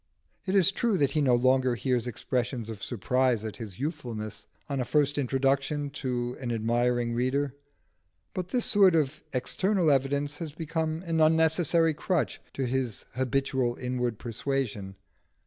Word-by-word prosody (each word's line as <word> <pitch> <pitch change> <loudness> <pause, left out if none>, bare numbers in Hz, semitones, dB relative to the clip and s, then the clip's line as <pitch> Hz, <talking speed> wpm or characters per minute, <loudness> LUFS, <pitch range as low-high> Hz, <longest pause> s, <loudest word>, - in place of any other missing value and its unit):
It 190 - +1
is 195 -1 +5
true 220 0 +1
that 140 -5 +2
he 155 - +1
no 130 -4 +4
longer 130 0 +3
hears 125 -1 0
expressions 120 -1 -2
of 105 -3 -9
surprise 125 0 0
at 110 - -5
his 105 -6 -7
youthfulness, 120 - -5 0.2
on 140 -2 -2
a - - +1
first 145 +2 +2
introduction 140 +2 0
to 125 -3 -3
an 125 -3 -3
admiring 120 +1 +1
reader; 130 +3 0 0.8
but 180 -1 -3
this 245 +5 0
sort 195 -5 +5
of 155 -2 0
external 170 +7 +1
evidence 140 +2 0
has 155 -2 -6
become 160 +1 -2
an 165 -1 +1
unnecessary 160 +1 +4
crutch 175 +2 -1
to 135 - -1
his 125 -3 -2
habitual 130 -1 0
inward 125 -2 -2
persuasion. 115 -5 -3
135 Hz, 145 wpm, -28 LUFS, 120-155 Hz, 0.8 s, is